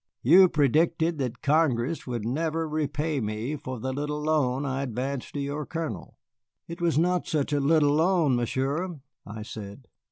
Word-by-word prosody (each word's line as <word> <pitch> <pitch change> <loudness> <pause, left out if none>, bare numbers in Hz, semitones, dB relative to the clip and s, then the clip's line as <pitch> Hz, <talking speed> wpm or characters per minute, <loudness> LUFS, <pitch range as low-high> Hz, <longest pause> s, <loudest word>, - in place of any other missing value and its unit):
"You 180 +8 +7
predicted 160 +3 +2
that 125 -2 -3
Congress 145 -2 +1
would 120 -4 -3
never 160 +6 -1
repay 150 0 -1
me 110 +6 -3
for 130 -3 -6
the 130 +3 -3
little 150 +2 -3
loan 145 -3 +1
I 135 0 -2
advanced 130 +2 -4
to - - -2
your 145 +2 -3
Colonel." 165 -2 -5 0.5
"It 170 +1 -8
was 170 -3 +2
not 180 +2 +1
such 150 -2 -1
a 145 - +2
little 145 0 +3
loan, 160 -3 +3
Monsieur," 140 +8 -2 0.3
I 105 +1 -7
said. 110 +3 -9
145 Hz, 160 wpm, -27 LUFS, 130-160 Hz, 0.5 s, You